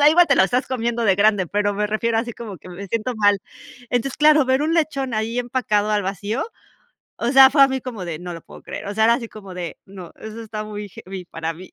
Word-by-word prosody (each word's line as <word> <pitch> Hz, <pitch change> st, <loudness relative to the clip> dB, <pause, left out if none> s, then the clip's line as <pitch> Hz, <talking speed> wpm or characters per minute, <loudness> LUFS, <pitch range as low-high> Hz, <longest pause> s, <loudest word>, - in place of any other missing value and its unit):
Ya 290 Hz, -, +8 dB
igual 340 Hz, +2 st, +5 dB
te 280 Hz, -, +4 dB
lo 190 Hz, -, +6 dB
estás 250 Hz, +6 st, 0 dB
comiendo 235 Hz, -2 st, -1 dB
de 195 Hz, -3 st, +4 dB
grande, 205 Hz, -2 st, +3 dB
pero 205 Hz, 0 st, 0 dB
me 210 Hz, +1 st, -1 dB
refiero 225 Hz, +1 st, 0 dB
así 235 Hz, +1 st, -2 dB
como 215 Hz, -5 st, -8 dB
que 170 Hz, -, -14 dB
me 180 Hz, +3 st, -8 dB
siento 230 Hz, +4 st, -2 dB
mal. 205 Hz, -1 st, +4 dB, 0.5 s
Entonces, 245 Hz, +2 st, -1 dB
claro, 300 Hz, -1 st, +5 dB
ver 260 Hz, +2 st, +2 dB
un 320 Hz, +2 st, +1 dB
lechón 280 Hz, -6 st, 0 dB
ahí 225 Hz, +2 st, -1 dB
empacado 225 Hz, -4 st, 0 dB
al 210 Hz, -1 st, +1 dB
vacío, 200 Hz, +5 st, -2 dB, 0.7 s
o 235 Hz, -, -2 dB
sea, 265 Hz, -1 st, +9 dB
fue 280 Hz, 0 st, +5 dB
a 275 Hz, -, +7 dB
mí 265 Hz, 0 st, -2 dB
como 230 Hz, -7 st, -6 dB
de: 160 Hz, -2 st, -4 dB
"No 175 Hz, +1 st, -7 dB
lo 165 Hz, -, -8 dB
puedo -, -, -14 dB
creer", -, -, -7 dB
o 200 Hz, -, -4 dB
sea, 220 Hz, +1 st, +3 dB
era 230 Hz, +1 st, +5 dB
así 235 Hz, -2 st, -4 dB
como 200 Hz, -3 st, -11 dB
de: 175 Hz, -2 st, -5 dB
“No, 190 Hz, -3 st, -11 dB
eso 220 Hz, +1 st, -8 dB
está 215 Hz, -1 st, -6 dB
muy 210 Hz, -1 st, -6 dB
heavy 185 Hz, 0 st, -9 dB
para 165 Hz, -1 st, -4 dB
mí”. 185 Hz, +3 st, -12 dB
220 Hz, 255 wpm, -21 LUFS, 200-255 Hz, 0.7 s, sea